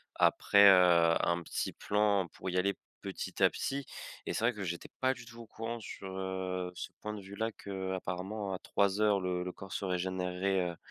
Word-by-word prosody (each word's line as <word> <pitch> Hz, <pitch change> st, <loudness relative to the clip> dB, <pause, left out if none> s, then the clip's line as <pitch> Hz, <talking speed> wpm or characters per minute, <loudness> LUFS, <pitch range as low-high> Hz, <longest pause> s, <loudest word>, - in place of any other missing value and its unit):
après, 100 Hz, 0 st, +5 dB
heu, 85 Hz, -3 st, +6 dB
un 85 Hz, 0 st, +1 dB
petit -, -, -2 dB
plan 100 Hz, -3 st, +2 dB
pour 95 Hz, -, -5 dB
y 90 Hz, -, -1 dB
aller 100 Hz, +2 st, +2 dB, 0.3 s
petit -, -, -5 dB
à -, -, +8 dB
petit. 140 Hz, -1 st, -3 dB, 0.4 s
Et -, -, -2 dB
c'est -, -, -2 dB
vrai 120 Hz, -, +3 dB
que 100 Hz, -2 st, -5 dB
j'étais 85 Hz, -1 st, -4 dB
pas 130 Hz, 0 st, +3 dB
du 120 Hz, -, -12 dB
tout 115 Hz, 0 st, -12 dB
au 115 Hz, -, -11 dB
courant 115 Hz, +1 st, -5 dB
sur, 95 Hz, -2 st, -7 dB
heu, 95 Hz, -1 st, -3 dB
ce -, -, -5 dB
point 105 Hz, 0 st, -4 dB
de 105 Hz, -, -6 dB
vue-là 100 Hz, +4 st, -3 dB
qu'apparemment 95 Hz, +1 st, -4 dB
à 90 Hz, -, -3 dB
03:00 100 Hz, 0 st, +2 dB
le 90 Hz, -1 st, -1 dB
le 90 Hz, -, -3 dB
corps 95 Hz, -1 st, -10 dB
se 100 Hz, -, -2 dB
régénèrerait 90 Hz, 0 st, 0 dB
heu 85 Hz, -, -11 dB
95 Hz, 200 wpm, -32 LUFS, 90-105 Hz, 0.4 s, à